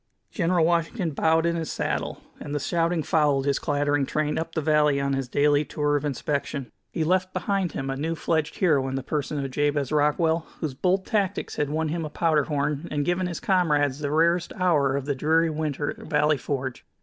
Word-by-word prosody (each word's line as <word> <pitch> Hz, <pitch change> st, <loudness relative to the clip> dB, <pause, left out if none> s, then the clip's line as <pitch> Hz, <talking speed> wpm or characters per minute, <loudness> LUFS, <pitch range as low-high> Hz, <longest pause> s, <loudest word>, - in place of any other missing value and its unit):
'" -, -, -49 dB
General 170 Hz, -3 st, +2 dB
Washington 170 Hz, +2 st, 0 dB
bowed 160 Hz, +3 st, +2 dB
in 170 Hz, 0 st, +1 dB
his 165 Hz, -2 st, -3 dB
saddle, -, -, -2 dB, 0.2 s
and 145 Hz, 0 st, -5 dB
the -, -, 0 dB
shouting 165 Hz, +2 st, 0 dB
followed 145 Hz, -4 st, +2 dB
his 140 Hz, -1 st, +1 dB
clattering 145 Hz, 0 st, +1 dB
train 150 Hz, -1 st, -1 dB
up 165 Hz, 0 st, -5 dB
the -, -, +1 dB
valley 150 Hz, -2 st, +3 dB
on 140 Hz, 0 st, 0 dB
his 135 Hz, -1 st, -2 dB
daily 145 Hz, +3 st, +3 dB
tour 145 Hz, 0 st, -1 dB
of 145 Hz, -, 0 dB
inspection. 140 Hz, -2 st, -3 dB, 0.2 s
He 160 Hz, -, -1 dB
left 185 Hz, +3 st, +1 dB
behind 195 Hz, -5 st, -1 dB
him 135 Hz, -, -4 dB
a -, -, -2 dB
new 160 Hz, +4 st, -2 dB
fledged 160 Hz, 0 st, -1 dB
hero 145 Hz, -8 st, +2 dB
in 130 Hz, -, -3 dB
the 135 Hz, -, -3 dB
person 145 Hz, -1 st, -2 dB
of 135 Hz, -, -5 dB
Jabez 145 Hz, 0 st, 0 dB
Rockwell, 160 Hz, +2 st, +2 dB
whose 155 Hz, -4 st, -3 dB
bold 185 Hz, +7 st, 0 dB
tactics 200 Hz, -4 st, -1 dB
had 145 Hz, -1 st, 0 dB
won 155 Hz, +1 st, -1 dB
him 165 Hz, +1 st, -2 dB
a 155 Hz, -, -4 dB
powder 155 Hz, -1 st, +1 dB
horn 150 Hz, +1 st, -1 dB
and 145 Hz, -1 st, -1 dB
given 180 Hz, +1 st, 0 dB
his 170 Hz, -, -4 dB
comrades 150 Hz, -, +2 dB
the 145 Hz, -1 st, -2 dB
rarest 165 Hz, +3 st, +2 dB
hour 150 Hz, -7 st, +2 dB
of 140 Hz, -1 st, -2 dB
the 145 Hz, -, 0 dB
dreary 160 Hz, +4 st, +2 dB
winter 150 Hz, -2 st, -2 dB
at -, -, -10 dB
Valley 150 Hz, 0 st, +2 dB
Forge. 130 Hz, 0 st, -4 dB
150 Hz, 210 wpm, -25 LUFS, 145-165 Hz, 0.2 s, valley